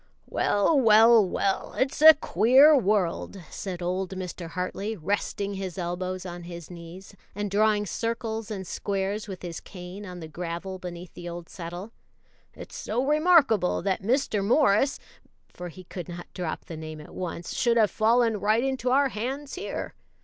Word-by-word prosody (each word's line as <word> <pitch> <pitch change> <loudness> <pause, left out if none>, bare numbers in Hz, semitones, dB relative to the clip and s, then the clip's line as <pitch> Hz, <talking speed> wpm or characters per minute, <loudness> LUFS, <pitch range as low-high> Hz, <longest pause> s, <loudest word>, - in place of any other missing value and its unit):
"Well, 205 +9 +2
well, 225 -1 +7
well, 195 +1 -1
it's 270 +2 0
a 315 0 +11
queer 275 +3 +5
world," 200 -5 0
said 180 -3 -5
old 185 +1 -1
Mr. 180 -2 -6
Hartley, 195 +5 -3
resting 200 +3 -2
his 190 -2 -5
elbows 185 +1 -3
on 175 -1 -6
his 170 -1 -9
knees, 175 +3 -11 0.2
and 205 -1 -3
drawing 210 0 +3
circles 225 0 -3
and 195 -3 -5
squares 200 +3 -3
with 190 -3 -8
his 170 -2 -5
cane 185 +1 -9
on 180 -3 -8
the 160 - -7
gravel 175 +3 -5
beneath 175 -1 -8
the 175 0 -7
old 170 0 -8
settle 175 +4 -7 0.6
"it's - - -10
so 245 +5 -2
remarkable 295 - +4
that 190 -1 0
Mr. 225 -1 +1
Morris 250 +2 +3 0.6
(for 180 0 -7
he 185 +2 -12
could 180 -1 -8
not 175 0 -7
drop 175 -4 -4
the 165 - -7
name 155 0 -7
at 150 - -12
once) 175 -1 -5
should 235 -1 +2
have 215 -3 +4
fallen 230 0 +3
right 215 +4 +2
into 265 -2 -1
our 275 +2 +4
hands 265 +6 -4
here. 380 - -5
195 Hz, 165 wpm, -26 LUFS, 180-230 Hz, 0.6 s, a